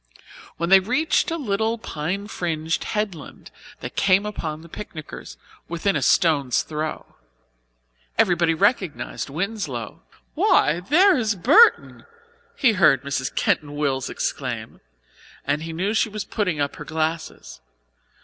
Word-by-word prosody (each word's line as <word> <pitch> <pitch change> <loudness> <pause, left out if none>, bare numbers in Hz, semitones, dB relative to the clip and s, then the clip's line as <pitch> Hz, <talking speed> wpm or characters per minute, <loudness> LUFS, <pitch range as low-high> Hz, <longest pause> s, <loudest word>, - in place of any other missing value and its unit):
When 170 +1 -2
they 195 0 +8
reached 255 +11 +1
a 330 - -2
little 220 -4 -1
pine 190 +1 -4
fringed 160 -5 -2
headland 205 -8 -5 0.3
they - - -5
came 195 +1 +2
upon 160 -7 -5
the 165 - -13
picnickers, 155 - -9 0.3
within 170 +4 -1
a - - 0
stone's 145 -9 +2
throw. 155 0 -5 1.0
Everybody 170 -2 +3
recognized 190 - -1
Winslow. 155 - -4 0.3
"Why, 150 - +3
there 350 - +4
is 220 -5 0
Burton!" 295 - +4 0.5
he 260 - +3
heard 155 -9 +4
Mrs. 135 -2 -3
Keyton 145 -1 0
Wells 135 -3 -1
exclaim, - - -4 0.6
and 145 +2 0
he 165 +1 -6
knew 185 +6 -1
she 220 - +1
was 210 -1 -5
putting 180 -9 -2
up 140 0 -2
her - - -8
glasses. 160 - -4
175 Hz, 130 wpm, -23 LUFS, 155-210 Hz, 1.0 s, they